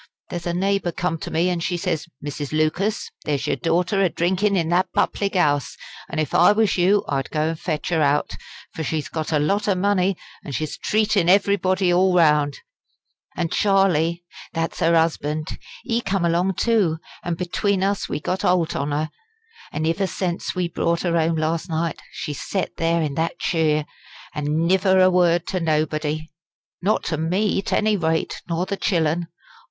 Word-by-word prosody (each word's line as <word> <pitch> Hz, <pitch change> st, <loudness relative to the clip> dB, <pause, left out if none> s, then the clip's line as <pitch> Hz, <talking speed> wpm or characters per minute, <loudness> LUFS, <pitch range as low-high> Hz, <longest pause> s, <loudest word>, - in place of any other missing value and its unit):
There's 175 Hz, 0 st, -4 dB
a 170 Hz, -, -1 dB
neighbour 195 Hz, -1 st, 0 dB
come 165 Hz, -1 st, -2 dB
to -, -, -6 dB
me, 165 Hz, +3 st, +1 dB
an' 175 Hz, -, -1 dB
she 175 Hz, +1 st, -1 dB
says: 170 Hz, -3 st, -2 dB, 0.2 s
'Mrs. 145 Hz, -1 st, -5 dB
Lucas, 155 Hz, +7 st, 0 dB
there's 145 Hz, -3 st, -1 dB
your -, -, +1 dB
daughter 175 Hz, -, +1 dB
a 190 Hz, -, +3 dB
drinkin' 190 Hz, +5 st, +1 dB
in 165 Hz, -2 st, 0 dB
that 175 Hz, +2 st, +2 dB
public 200 Hz, -1 st, 0 dB
'ouse, 145 Hz, -6 st, +1 dB, 0.3 s
an' -, -, -5 dB
if 155 Hz, -3 st, -1 dB
I 175 Hz, -, +6 dB
was 215 Hz, -1 st, +2 dB
you 195 Hz, +3 st, +3 dB
I'd 135 Hz, -2 st, -2 dB
go 155 Hz, 0 st, 0 dB
and 165 Hz, -1 st, -4 dB
fetch 155 Hz, -4 st, -3 dB
her 165 Hz, -3 st, +1 dB
out; 145 Hz, 0 st, +2 dB, 0.4 s
for 160 Hz, -, -4 dB
she's 155 Hz, 0 st, -2 dB
got 160 Hz, -1 st, -3 dB
a 155 Hz, -, +3 dB
lot 195 Hz, +9 st, +1 dB
o' 200 Hz, -, +3 dB
money, 190 Hz, -1 st, +1 dB, 0.3 s
an' 140 Hz, -, -7 dB
she's 155 Hz, +3 st, -3 dB
treatin' 210 Hz, -4 st, +1 dB
everybody 190 Hz, -2 st, +3 dB
all 185 Hz, +1 st, +3 dB
round.' 150 Hz, -4 st, +3 dB, 0.8 s
An' 165 Hz, -, 0 dB
Charlie 175 Hz, -4 st, +2 dB, 0.3 s
that's 165 Hz, 0 st, -3 dB
'er 165 Hz, -, +4 dB
'usband 155 Hz, -1 st, 0 dB, 0.3 s
ee 230 Hz, +1 st, 0 dB
come 195 Hz, -4 st, 0 dB
along 175 Hz, +3 st, +1 dB
too, 205 Hz, -9 st, +2 dB, 0.3 s
an' 175 Hz, -1 st, -2 dB
between 185 Hz, +3 st, 0 dB
us 200 Hz, 0 st, -1 dB
we -, -, -2 dB
got 185 Hz, +5 st, -2 dB
holt 180 Hz, -3 st, +1 dB
on 140 Hz, +1 st, -1 dB
her. 150 Hz, +2 st, -1 dB, 0.6 s
An' 155 Hz, -, -2 dB
iver 165 Hz, +4 st, +1 dB
sence 180 Hz, -1 st, -3 dB
we 180 Hz, -1 st, 0 dB
brought 170 Hz, 0 st, 0 dB
her 170 Hz, -2 st, 0 dB
'ome 165 Hz, 0 st, +2 dB
last 160 Hz, +2 st, -1 dB
night, 165 Hz, -1 st, -2 dB
she 150 Hz, -, -5 dB
set 185 Hz, +5 st, -3 dB
there 165 Hz, 0 st, +1 dB
in 150 Hz, -2 st, -2 dB
that 165 Hz, +3 st, -1 dB
cheer, 155 Hz, -3 st, +1 dB, 0.5 s
an' 150 Hz, +2 st, 0 dB
niver 190 Hz, +1 st, +3 dB
a 185 Hz, 0 st, +6 dB
word 175 Hz, -2 st, +3 dB
to 185 Hz, -, -1 dB
nobody! 155 Hz, -1 st, -1 dB, 0.5 s
Not 205 Hz, +4 st, +1 dB
to 155 Hz, -, -2 dB
me 190 Hz, +6 st, +1 dB
't -, -, -1 dB
any 215 Hz, 0 st, +2 dB
rate, 160 Hz, -3 st, -1 dB
nor 170 Hz, +2 st, 0 dB
the 200 Hz, +1 st, -3 dB
chillen. 170 Hz, -3 st, 0 dB
170 Hz, 185 wpm, -22 LUFS, 155-190 Hz, 0.8 s, I